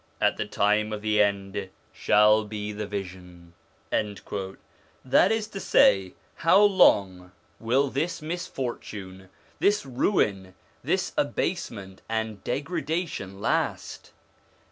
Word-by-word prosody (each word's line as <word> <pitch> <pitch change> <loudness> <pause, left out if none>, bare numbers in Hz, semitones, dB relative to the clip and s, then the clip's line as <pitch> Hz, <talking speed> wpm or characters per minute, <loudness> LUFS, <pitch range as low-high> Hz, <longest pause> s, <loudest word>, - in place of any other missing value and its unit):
at - - +2
the - - -3
time 105 +1 +1
of 105 0 -5
the 105 -1 +3
end 100 -1 -1 0.2
shall 105 +1 +4
be 105 0 -5
the 105 0 -5
vision/ 90 -4 -8 0.4
That 100 - -2
is 220 -1 0
to 200 - -7
say, 95 - +3 0.2
how 170 +4 +5
long 95 - +3 0.3
will 130 +4 +1
this 155 +6 -2
misfortune, 120 - -6 0.3
this 205 -6 +2
ruin, 105 - 0 0.3
this - - -1
abasement 95 -1 -3
and 110 -3 -3
degradation 150 - -3
last - - -2
105 Hz, 105 wpm, -26 LUFS, 95-135 Hz, 0.4 s, how